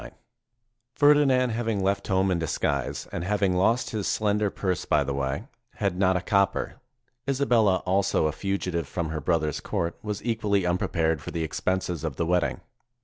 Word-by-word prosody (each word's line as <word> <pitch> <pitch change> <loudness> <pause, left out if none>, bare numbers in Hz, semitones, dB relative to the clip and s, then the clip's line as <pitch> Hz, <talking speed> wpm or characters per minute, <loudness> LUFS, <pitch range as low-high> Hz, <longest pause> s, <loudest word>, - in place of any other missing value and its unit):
Ferdinand, 140 -4 +4
having 110 -3 -1
left 100 +1 0
home 95 0 +2
in 85 - +1
disguise, 70 -4 -2
and 85 - -3
having 100 -1 +1
lost 110 +7 +2
his 105 -3 -2
slender 105 -1 +1
purse 90 -2 -2
by 75 -2 +2
the 70 0 -3
way, 70 +6 -2 0.3
had 100 -3 -1
not 95 0 +3
a - - -2
copper. 100 0 +1 0.5
Isa 140 0 +1
bella 110 -8 +3
also, 95 -3 +2
a 75 - +2
fugitive 90 -2 -2
from 85 0 -3
her 80 -1 -3
brother's 75 -2 0
court, 85 0 -3
was 105 -1 -5
equally 105 -5 +1
unprepared 80 -3 0
for - - -7
the 85 - -2
expenses 90 +1 -2
of 80 -4 -3
the 85 - -1
wedding. 90 0 0
95 Hz, 170 wpm, -26 LUFS, 85-105 Hz, 0.5 s, Ferdinand